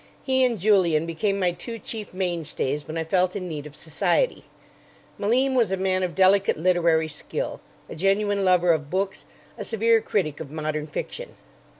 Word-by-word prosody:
He 260 Hz, -1 st, +2 dB
and 245 Hz, -3 st, +2 dB
Julian 175 Hz, -5 st, +3 dB
became 195 Hz, +5 st, -1 dB
my 180 Hz, -2 st, +2 dB
two 230 Hz, +7 st, -7 dB
chief 220 Hz, -2 st, -6 dB
mainstays 165 Hz, -6 st, -2 dB
when 155 Hz, -, -5 dB
I 165 Hz, -, 0 dB
felt 180 Hz, +2 st, +1 dB
in 185 Hz, -2 st, -4 dB
need 150 Hz, -3 st, -5 dB
of 150 Hz, -, -14 dB
society. 175 Hz, -, 0 dB, 0.7 s
Malim 255 Hz, +6 st, +2 dB
was 235 Hz, -6 st, +2 dB
a 190 Hz, -, 0 dB
man 185 Hz, 0 st, +1 dB
of 180 Hz, -2 st, -2 dB
delicate 195 Hz, +1 st, +4 dB
literary 165 Hz, -2 st, +2 dB
skill, 150 Hz, -, -5 dB, 0.3 s
a -, -, -8 dB
genuine 200 Hz, +3 st, +1 dB
lover 180 Hz, -2 st, +4 dB
of 150 Hz, -3 st, -1 dB
books, 195 Hz, +2 st, -2 dB, 0.3 s
a -, -, -3 dB
severe 225 Hz, 0 st, +2 dB
critic 155 Hz, -11 st, -1 dB
of 150 Hz, -, -7 dB
modern 155 Hz, 0 st, -3 dB
fiction. -, -, -6 dB
185 Hz, 175 wpm, -24 LUFS, 160-205 Hz, 0.7 s, delicate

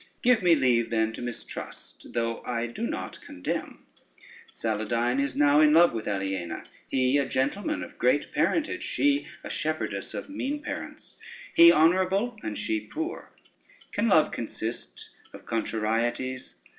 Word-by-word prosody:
Give 245 Hz, -2 st, +5 dB
me 175 Hz, -2 st, +5 dB
leave 125 Hz, -5 st, +2 dB
then 110 Hz, -1 st, +1 dB
to -, -, -7 dB
mistrust, 120 Hz, -1 st, -7 dB
though 115 Hz, -1 st, -1 dB
I 120 Hz, -1 st, -2 dB
do 120 Hz, 0 st, -4 dB
not -, -, -5 dB
condemn. 90 Hz, -, -5 dB, 0.7 s
Saladyne 115 Hz, +4 st, 0 dB
is 140 Hz, -1 st, -2 dB
now 145 Hz, +1 st, +5 dB
in 150 Hz, -1 st, +6 dB
love 170 Hz, -3 st, +6 dB
with 115 Hz, -2 st, -4 dB
Aliena, 95 Hz, -3 st, -3 dB, 0.3 s
he 130 Hz, +1 st, +2 dB
a 140 Hz, -, 0 dB
gentleman 195 Hz, -, -1 dB
of -, -, -11 dB
great -, -, +2 dB
parentage, 335 Hz, +3 st, +1 dB
she 285 Hz, 0 st, +1 dB, 0.2 s
a -, -, -6 dB
shepherdess -, -, -3 dB
of -, -, -5 dB
mean 290 Hz, 0 st, -3 dB
parents; -, -, -7 dB, 0.4 s
he 170 Hz, 0 st, +9 dB
honorable 185 Hz, +8 st, +3 dB
and 105 Hz, -, -4 dB
she 110 Hz, -, -1 dB
poor? 320 Hz, -, -5 dB, 0.6 s
Can 220 Hz, +3 st, 0 dB
love 160 Hz, -7 st, +4 dB
consist 110 Hz, -, -6 dB, 0.2 s
of -, -, -12 dB
contrarieties? 115 Hz, +3 st, -2 dB
130 Hz, 145 wpm, -27 LUFS, 115-185 Hz, 0.7 s, he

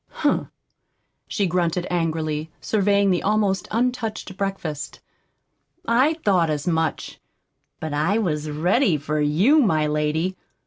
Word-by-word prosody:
"Humph!" -, -, +2 dB, 0.8 s
she 200 Hz, -, 0 dB
grunted 175 Hz, 0 st, 0 dB
angrily, 160 Hz, -2 st, -1 dB
surveying 200 Hz, -1 st, +2 dB
the 180 Hz, -, +1 dB
almost 200 Hz, -2 st, +1 dB
untouched 230 Hz, -4 st, -2 dB
breakfast. 190 Hz, -7 st, -4 dB, 0.9 s
"I 260 Hz, +7 st, +3 dB
thought 180 Hz, -5 st, +3 dB
as 150 Hz, -1 st, -2 dB
much! 160 Hz, -2 st, -1 dB, 0.6 s
But 155 Hz, -2 st, -4 dB
I 155 Hz, +8 st, +1 dB
was 155 Hz, -8 st, -1 dB
ready 175 Hz, -, +2 dB
for 150 Hz, +1 st, -2 dB
you, 185 Hz, -, +4 dB
my 160 Hz, -, +2 dB
lady. 150 Hz, +4 st, 0 dB
175 Hz, 120 wpm, -23 LUFS, 155-205 Hz, 0.9 s, you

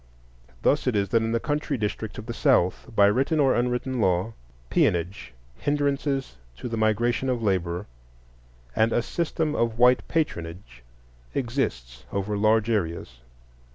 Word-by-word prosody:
Thus 145 Hz, -1 st, +2 dB
it 125 Hz, -, +2 dB
is 100 Hz, -2 st, +1 dB
that 115 Hz, -, +3 dB
in 115 Hz, 0 st, -1 dB
the 115 Hz, -, +1 dB
country 145 Hz, 0 st, -2 dB
districts 110 Hz, 0 st, -3 dB
of 110 Hz, -, -7 dB
the 115 Hz, -, -5 dB
South, 120 Hz, -, +2 dB
by 100 Hz, -, +6 dB
written 135 Hz, +10 st, +2 dB
or 135 Hz, -2 st, +4 dB
unwritten 125 Hz, +1 st, -1 dB
law, 95 Hz, +3 st, +1 dB, 0.4 s
peonage, 90 Hz, +3 st, 0 dB, 0.3 s
hindrances 140 Hz, -, -1 dB, 0.2 s
to -, -, -6 dB
the 115 Hz, -, -3 dB
migration 115 Hz, +4 st, +1 dB
of 120 Hz, -2 st, -1 dB
labor, 90 Hz, -2 st, 0 dB, 0.9 s
and 110 Hz, +1 st, +3 dB
a 120 Hz, -, +2 dB
system 160 Hz, +1 st, -1 dB
of 115 Hz, -5 st, 0 dB
white 125 Hz, +1 st, +4 dB
patronage 85 Hz, -, -3 dB, 0.5 s
exists -, -, -2 dB
over 100 Hz, +1 st, -2 dB
large 110 Hz, +1 st, +3 dB
areas. 85 Hz, -, -2 dB
115 Hz, 145 wpm, -25 LUFS, 100-130 Hz, 0.9 s, by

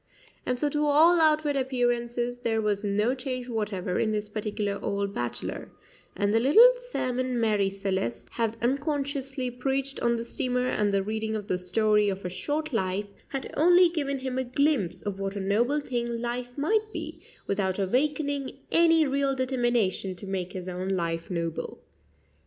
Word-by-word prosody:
And 250 Hz, -1 st, 0 dB
so 295 Hz, -, +2 dB
to 295 Hz, +1 st, 0 dB
all 325 Hz, +4 st, +6 dB
outward 305 Hz, -2 st, +3 dB
appearances 245 Hz, -2 st, -1 dB
there 225 Hz, -2 st, 0 dB
was 210 Hz, -1 st, 0 dB
no 210 Hz, +4 st, +1 dB
change 255 Hz, -1 st, -4 dB
whatever 210 Hz, -6 st, -2 dB
in 215 Hz, -, +1 dB
this 210 Hz, -1 st, -2 dB
particular 210 Hz, -1 st, -3 dB
old 200 Hz, 0 st, -1 dB
bachelor, 120 Hz, -7 st, -4 dB, 0.5 s
and 205 Hz, +1 st, +1 dB
the 225 Hz, -, +4 dB
little 440 Hz, -, +7 dB
sermon 255 Hz, -, -2 dB
Marie 210 Hz, -3 st, +2 dB
Celeste 190 Hz, -12 st, -3 dB
had 230 Hz, -1 st, -1 dB
unconsciously 275 Hz, -1 st, -1 dB
preached 270 Hz, +2 st, -2 dB
on 235 Hz, 0 st, +1 dB
the 230 Hz, -, -4 dB
steamer 250 Hz, +1 st, -1 dB
and 210 Hz, -4 st, +1 dB
the 195 Hz, -1 st, +1 dB
reading 220 Hz, +1 st, -2 dB
of 210 Hz, -2 st, -4 dB
the 180 Hz, -, 0 dB
"Story 210 Hz, +3 st, +2 dB
of 195 Hz, -1 st, -4 dB
a 180 Hz, -, -3 dB
Short 300 Hz, -, -2 dB
Life" 195 Hz, -1 st, -1 dB, 0.2 s
had 270 Hz, -1 st, -5 dB
only 350 Hz, +3 st, +6 dB
given 285 Hz, -5 st, -1 dB
him 260 Hz, -1 st, -3 dB
a -, -, 0 dB
glimpse 255 Hz, -, 0 dB
of 200 Hz, -2 st, -4 dB
what 195 Hz, 0 st, -3 dB
a -, -, -3 dB
noble 230 Hz, +9 st, +1 dB
thing 245 Hz, -4 st, -2 dB
life 240 Hz, +2 st, -4 dB
might 430 Hz, +9 st, +1 dB
be, -, -, -7 dB, 0.2 s
without 190 Hz, -2 st, -1 dB
awakening 280 Hz, +6 st, 0 dB
any 330 Hz, -1 st, +5 dB
real 275 Hz, 0 st, +1 dB
determination 240 Hz, -7 st, 0 dB
to 180 Hz, -, -9 dB
make 190 Hz, -2 st, -3 dB
his 185 Hz, -1 st, -6 dB
own 185 Hz, +1 st, -4 dB
life 170 Hz, -3 st, -2 dB
noble. 170 Hz, -3 st, -3 dB
240 Hz, 170 wpm, -27 LUFS, 200-275 Hz, 0.5 s, little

